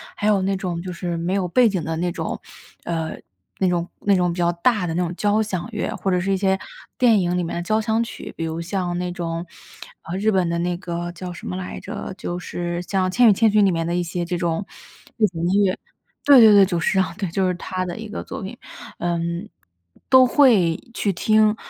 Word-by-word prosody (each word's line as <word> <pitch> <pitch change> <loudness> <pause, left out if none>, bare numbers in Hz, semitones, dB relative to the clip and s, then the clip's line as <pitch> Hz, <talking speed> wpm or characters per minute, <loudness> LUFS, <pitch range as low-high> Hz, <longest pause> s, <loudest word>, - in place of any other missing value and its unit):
还 210 - -1
有 200 -2 +3
那 195 +1 0
种 180 -3 -3
就 185 0 -6
是 170 -1 -3
没 175 +3 -2
有 190 -2 0
背 245 +6 +4
景 190 -5 -1
的 160 0 -2
那 175 +1 -1
种， - - -4 0.4
呃， 165 -2 -2 0.5
那 190 - +2
种 175 -1 0
那 200 -1 +3
种 180 -1 +2
比 170 - -6
较 175 0 +2
大 185 +2 +1
的 165 - -2
那 180 - 0
种 175 +1 -3
交 210 +3 +2
响 195 -3 -3
乐， 210 - -2
或 195 - -2
者 180 - +2
是 190 +2 -1
一 195 - +2
些 190 0 +2 0.4
电 235 -5 +5
影 180 -1 0
里 180 - 0
面 165 - -4
的 175 - -2
交 215 +4 +1
响 220 +1 +1
曲。 230 - -8
比 165 - -2
如 160 +1 -3
像 180 0 -2
那 180 0 -2
种， 170 -1 -4 0.6
啊， 170 - -6
日 210 +3 +1
本 185 -3 +2
的 170 - -1
那 175 0 -1
个 175 -1 -4
叫 180 +1 -7
什 175 - -9
么 180 - -3
来 185 -1 -5
着？ - - -6
就 175 - -4
是 175 -1 -4
像 185 0 0
《千 245 +1 +6
与 210 - +7
千 220 +3 +3
寻》 210 0 +4
里 195 - +4
面 165 -1 -1
的 170 +1 -1
一 175 - +1
些 175 +1 -3
这 175 0 -2
种 170 +1 -1 0.5
背 220 - +4
景 165 -2 -6
音 200 +3 +3
乐 190 -1 +1 0.5
对 280 -2 +8
对 220 - +9
对， 200 -1 +7
久 180 -3 -1
石 190 +4 +1
让， 180 -3 0
对， 195 -2 -3
就 185 +3 0
是 180 - +1
他 185 +1 -4
的 175 - -5
一 220 -1 -7
个 - - -5
作 - - -7
品。 200 +5 -7 0.4
嗯， 170 +2 -2 0.6
都 260 -1 +8
会 225 - +4 0.2
去 200 -4 0
听， 215 +3 +3
180 Hz, 260 characters per minute, -22 LUFS, 175-205 Hz, 0.6 s, 对